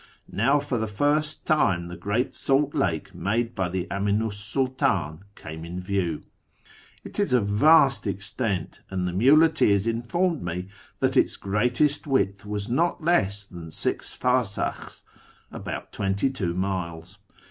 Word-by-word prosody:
Now 140 +2 +3
for 140 -4 -2
the 110 - -1
first 145 +8 0
time 95 - +2
the 90 - -7
great 105 +8 -1
salt 140 +1 +1
lake 85 -5 -1
made 115 +3 -1
by 95 -2 -1
the 90 0 -2
Aminu 105 +3 0
's - - -8
Sididn 105 - -1 0.2
came 80 0 -8
in 85 +2 -6
view. 90 -4 -2 0.8
It - - -8
is 200 -10 +1
of 120 -5 +3
vast 135 +4 +5
extent, 100 -1 -3
and 95 -1 -2
the 90 - -3
muleteers 130 - +4
informed 135 +9 0
me 90 +2 -4 0.3
that - - +2
its - - +3
greatest 125 +9 +1
width 100 -7 0
was 105 0 -3
not 165 +7 0
less 100 - +2
than 85 -4 -10
six - - -3
farsakhs 125 -5 -1 0.5
(about - - -6
twenty 100 +7 0
two 90 -10 -2
miles). 90 -1 -4
105 Hz, 145 wpm, -25 LUFS, 95-135 Hz, 0.8 s, vast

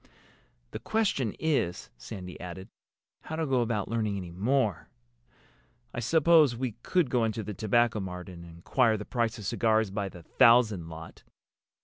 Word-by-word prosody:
The - - -6
question 190 - 0
is," 145 - -1
Sandy 90 - -9
added, 90 +1 -8 0.6
"how 160 - -5
to 160 0 -1
go 130 -3 +1
about 110 -4 -1
learning 110 -3 -1
any 90 -3 -6
more. 105 - 0 1.0
I - - -3
suppose 155 +1 +4
we 125 0 -2
could 170 -5 +1
go 125 -2 +2
into 110 0 -1
the 105 - -5
Tobacco 115 +2 +1
Mart 90 -2 -6
and 85 -2 -10
inquire 110 +8 +1
the 105 - -7
price 115 -3 -1
of 105 - -8
cigars 110 -1 +1
by 100 -1 -3
the 90 -2 -13
thousand 115 -7 +4
lot." 80 0 -10
110 Hz, 155 wpm, -28 LUFS, 95-125 Hz, 1.0 s, suppose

